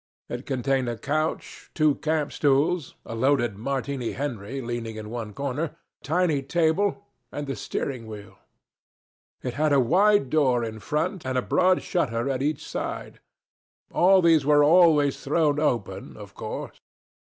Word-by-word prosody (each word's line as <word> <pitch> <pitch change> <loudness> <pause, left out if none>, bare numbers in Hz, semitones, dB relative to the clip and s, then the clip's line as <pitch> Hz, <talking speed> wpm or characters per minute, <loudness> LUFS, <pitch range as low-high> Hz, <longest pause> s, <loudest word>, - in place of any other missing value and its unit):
It 120 +2 -6
contained 130 -1 0
a 120 - -4
couch, 155 +6 -3
two 155 -2 +4
camp 155 -1 -1
stools, 145 +3 +1
a - - -7
loaded 120 -2 +1
Martini 135 +2 -3
Henry 130 -2 -4
leaning 120 -2 -4
in 110 0 -7
one 115 -3 -5
corner, 140 +5 -3
a 165 - -10
tiny 160 -2 +1
table, 170 +7 0 0.3
and 145 - -4
the 135 - -4
steering 125 -5 -4
wheel. 105 -2 -10 1.0
It 125 - -3
had 155 +2 +1
a 140 - +5
wide 185 - +3
door 130 -6 +3
in 110 -1 -5
front 160 - -2
and 130 0 -2
a 125 - +1
broad 185 0 +2
shutter 135 -6 -1
at 130 -1 -2
each 150 +1 -2
side. - - -5 0.7
All 185 +1 +5
these 165 -3 +5
were 145 +1 +5
always 155 -3 +4
thrown 150 0 +2
open, 120 -9 -2
of - - -11
course. - - -7
140 Hz, 155 wpm, -25 LUFS, 125-155 Hz, 1.0 s, a